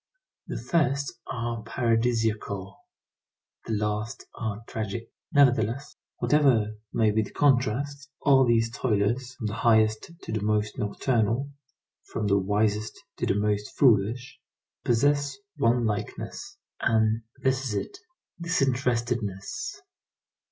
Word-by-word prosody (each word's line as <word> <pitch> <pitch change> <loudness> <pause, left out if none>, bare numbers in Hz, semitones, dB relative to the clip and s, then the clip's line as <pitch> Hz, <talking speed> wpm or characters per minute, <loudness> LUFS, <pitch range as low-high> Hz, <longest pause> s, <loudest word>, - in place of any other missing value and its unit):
The - - -4
first 140 -4 0
are 120 -2 -3
paradisiacal, 115 -4 0 0.9
the 115 - -1
last 105 +1 -2
are 110 -1 -4
tragic. 110 +1 -4 0.2
Nevertheless, 130 -2 +3 0.2
whatever 125 -8 +3 0.2
may 110 -2 +3
be 110 +1 +2
the 110 - -5
contrast, 140 +2 +1
all 135 -2 +5
these 115 -2 +2
toilers, 120 +2 0
from 115 - -6
the 105 - -2
highest 110 0 +3
to - - -6
the 110 -1 -1
most 105 0 0
nocturnal, 115 +4 0 0.6
from 110 - -2
the 100 -1 +3
wisest 105 +2 0 0.2
to - - -1
the - - +2
most 105 0 -1
foolish, 125 +2 +3 0.4
possess 140 - +2 0.2
one 120 -3 +3
likeness, 105 -1 -4 0.2
and 110 0 +2 0.2
this 130 0 +2
is 110 -5 -2
it: 100 - -4 0.4
disinterestedness. 125 - -1
115 Hz, 115 wpm, -27 LUFS, 105-130 Hz, 0.9 s, all